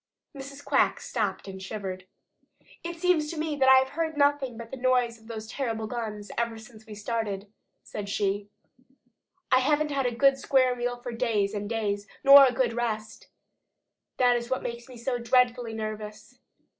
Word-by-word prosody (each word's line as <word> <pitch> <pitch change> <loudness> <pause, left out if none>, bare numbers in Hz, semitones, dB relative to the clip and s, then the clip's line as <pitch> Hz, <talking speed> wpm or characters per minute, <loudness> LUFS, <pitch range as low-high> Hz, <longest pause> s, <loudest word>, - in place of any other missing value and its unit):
Mrs. 275 +1 -9
Quack - - +2
stopped 205 -5 -3
and 190 -1 -8
shivered. 190 -2 -6 0.8
"It 340 0 -5
seems 330 -4 +2
to 330 - -6
me 305 -2 -3
I 265 0 +8
have 265 0 +3
heard 320 0 -3
nothing 285 -4 +2
but 230 0 -9
the 265 - -6
noise 250 -2 +1
of 220 - -19
those 220 -2 -6
terrible 225 -2 -3
guns 215 -3 -5
ever 235 -1 -1
since 220 0 -14
we 215 - -8
started," 210 -2 -4 0.3
said 205 -1 -6
she. 200 0 -1 1.0
"I 255 - +6
haven't 300 +3 +1
had 270 -2 0
a 240 - -3
good 275 +2 +4
square 255 -2 +3
meal 245 0 -2
for 245 0 -7
days 210 -3 0
and 205 -1 -4
days, 205 -3 -2 0.2
nor 275 0 +10
a - - +1
good 245 -1 0
rest. 220 -2 -4 0.9
That 245 -1 +4
is 240 0 -3
what 260 - -1
makes 235 +1 -6
me 250 - -11
so 245 +1 -2
dreadfully 245 -1 +2
nervous. 215 +2 -7
235 Hz, 175 wpm, -27 LUFS, 215-265 Hz, 1.0 s, nor